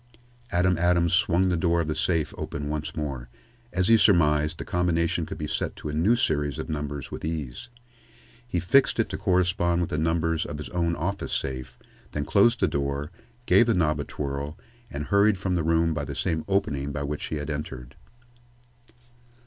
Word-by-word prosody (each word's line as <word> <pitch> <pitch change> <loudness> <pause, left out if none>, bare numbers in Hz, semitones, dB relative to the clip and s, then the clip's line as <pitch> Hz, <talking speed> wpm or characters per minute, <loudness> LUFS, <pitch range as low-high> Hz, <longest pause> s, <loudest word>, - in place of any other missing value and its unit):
Adam 90 0 +2
Adams 85 -1 +3
swung 90 0 +3
the 90 - +1
door 85 0 +2
of 85 - -1
the 80 - 0
safe 80 +1 0
open 75 0 -5
once 75 0 -4
more. 70 -6 -4 0.4
As 90 0 +1
he 115 -1 +6
surmised, 75 -6 +3
the - - -6
combination 85 -1 0
could - - -6
be 75 - -3
set - - -2
to - - -6
a - - -4
new 90 +10 +3
series 75 - 0
of - - -5
numbers 75 -2 -4
with - - -7
ease. 80 - -4 0.8
He 90 -7 -1
fixed 120 - +3
it 110 - +1
to 95 - -4
correspond 90 -2 +2
with 85 - -2
the 75 - 0
numbers 80 0 +1
of 75 - -6
his 75 - -7
own 85 -1 0
office 100 +4 -3
safe, 65 -2 -3 0.4
then 75 -1 -2
closed 115 - +3
the - - +4
door, 70 +2 -2 0.3
gave 120 - +5
the 115 - +3
knob 75 -4 +1
a - - -1
twirl, 70 +2 -5 0.3
and 75 0 -4
hurried 100 +4 +3
from 95 0 -2
the 90 - +1
room 80 0 +2
by 75 -1 -2
the - - -6
same 80 -1 -1
opening 75 -8 0
by 70 0 -3
which 75 +1 -3
he - - -4
had 75 +1 -4
entered. 75 -5 -6
80 Hz, 195 wpm, -26 LUFS, 75-90 Hz, 0.8 s, he